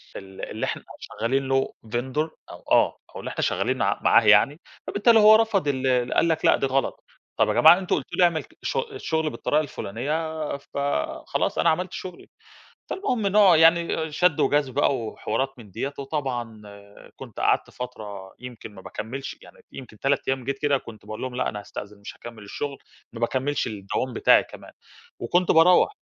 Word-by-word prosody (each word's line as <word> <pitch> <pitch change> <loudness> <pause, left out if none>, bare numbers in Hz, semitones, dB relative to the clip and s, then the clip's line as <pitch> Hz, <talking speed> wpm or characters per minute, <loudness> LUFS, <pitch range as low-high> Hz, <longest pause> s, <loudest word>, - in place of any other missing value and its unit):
ال 95 0 -10
اللي - - -3
إحنا - - -4 0.2
شغالين 130 +5 -2
له 135 0 0
Vendor 130 +7 -2 0.2
أو - - -12
آه - - +4 0.2
أو - - -6
اللي - - -6
إحنا - - -4
شغالين - - 0
ع - - +1
معاه 115 - +5
يعني، 110 +9 +5 0.3
فبالتالي 225 +2 +4
هو 215 0 +8
رفض 215 -8 +2
ال 130 -3 +1
قال 170 - +3
لك: 160 -1 0
'لأ، - - +5
دي - - -1
غلط.'" 135 0 -1 0.4
"طب - - +4
يا - - +1
جماعة 160 +3 +7
أنتم 185 - 0
قلتوا 135 - -5
لي 180 - +5
أعمل 170 -2 +2
ك - - -23
شغ 460 - -2
الشغل 160 - -1
بالطريقة 150 +1 0
الفلانية، 150 +5 -4
فخلاص 140 - -2
أنا 170 - +4
عملت 180 +3 -1
شغلي." 180 -2 -8 0.6
فالمهم 250 - -1
نوع 195 -4 +6
يعني 165 -1 +3
شد 180 -1 +2
وجذب 145 -3 +1
بقى 140 -1 +2
وحوارات 130 +4 -3
من 105 -4 -13
ديّة، 140 +9 -4
وطبعًا 125 -6 -4 0.5
كنت - - -10
قعدت - - +1
فترة 105 -6 -8
يمكن 120 -4 -10
ما 95 - -12
باكمّلش 125 +9 -6
يعني - - -16 0.2
يمكن 110 -5 -11
3 135 +1 0
أيام 135 -1 -1
جيت 135 +2 -3
كده، 145 -2 +2
كنت 110 -4 -13
باقول 110 +1 -7
لهم: 130 -1 -4
"لأ، 130 - 0
أنا 105 - -5
هاستأذن 100 0 -9
مش 100 - -9
هاكمّل 115 -3 -11
الشغل." 140 +7 -5 0.3
ما 115 - -9
باكمّلش 130 +4 -1
الدوام 110 +4 -3
بتاعي - - +5
كمان - - -13 0.5
وكنت 175 +10 +1
باروّح. 180 - +5
135 Hz, 180 wpm, -24 LUFS, 120-160 Hz, 0.6 s, هو